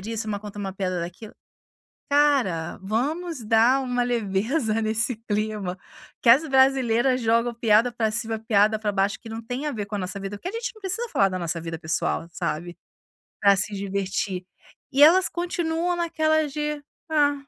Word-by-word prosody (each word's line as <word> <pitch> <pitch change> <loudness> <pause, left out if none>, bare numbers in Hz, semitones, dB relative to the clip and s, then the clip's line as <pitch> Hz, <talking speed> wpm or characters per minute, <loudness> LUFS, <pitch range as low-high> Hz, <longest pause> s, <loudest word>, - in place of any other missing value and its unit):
disso, 220 +2 -4
uma 205 -1 -2
conta 205 -1 -9
uma 195 -2 -4
piada 185 -2 -2
daquilo. 180 +6 -7 0.8
Cara, 275 - +2
vamos 275 - -2
dar 230 +5 +4
uma 250 -1 0
leveza 225 +1 0
nesse 220 +3 0
clima. 210 -3 -2 0.4
Que 235 - +6
as 295 +6 +5
brasileiras 265 -2 +3
jogam 230 +1 +2
piada 230 +1 +3
para 225 -2 0
cima, 220 +1 -2
piada 215 0 +2
para 210 -1 -1
baixo, 195 +1 0
que 230 - -11
não 225 +1 -6
tem 250 +6 -4
a 295 - -1
ver 210 -3 -3
com 205 +1 -8
a - - -3
nossa 190 +2 -4
vida, 195 +1 -6
porque 360 - -5
a - - -6
gente 465 +1 -4
não 435 - -17
precisa 420 +5 -2
falar 195 -1 +4
da 185 -1 -4
nossa 170 -1 -3
vida 165 -1 -5
pessoal, 160 +1 -1
sabe, 170 0 -4 0.6
para 200 -1 +5
se 190 +2 -1
divertir. 195 -1 -3 0.5
E 275 +2 +2
elas 360 +5 +6
continuam 345 0 -1
naquela 315 -2 +1
de: 300 0 -3 0.3
"Ah." 290 -2 +3
225 Hz, 180 wpm, -24 LUFS, 200-285 Hz, 0.8 s, Que